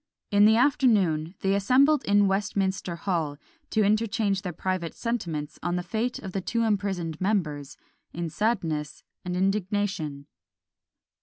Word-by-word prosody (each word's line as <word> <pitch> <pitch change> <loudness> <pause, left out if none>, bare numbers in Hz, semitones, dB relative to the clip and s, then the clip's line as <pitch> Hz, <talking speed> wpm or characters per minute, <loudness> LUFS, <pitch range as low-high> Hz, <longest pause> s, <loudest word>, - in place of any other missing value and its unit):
In 205 0 +6
the 220 +1 +6
afternoon 205 - +2
they 195 0 +2
assembled 260 +9 +4
in 205 0 +4
Westminster 195 -2 -1
hall, 165 -5 -2 0.3
to 215 - +2
interchange 210 -1 +1
their 185 -4 -4
private 180 0 -3
sentiments 170 -11 -3
on 175 +1 -1
the 180 - -2
fate 225 +6 -2
of 195 - -7
the 195 - -2
two 230 +5 -1
imprisoned 190 -7 -1
members, 155 -8 -1 0.3
in 170 0 -4
sadness 165 - -2 0.2
and 180 0 -3
indignation. 195 -6 -1
195 Hz, 135 wpm, -26 LUFS, 170-210 Hz, 0.3 s, In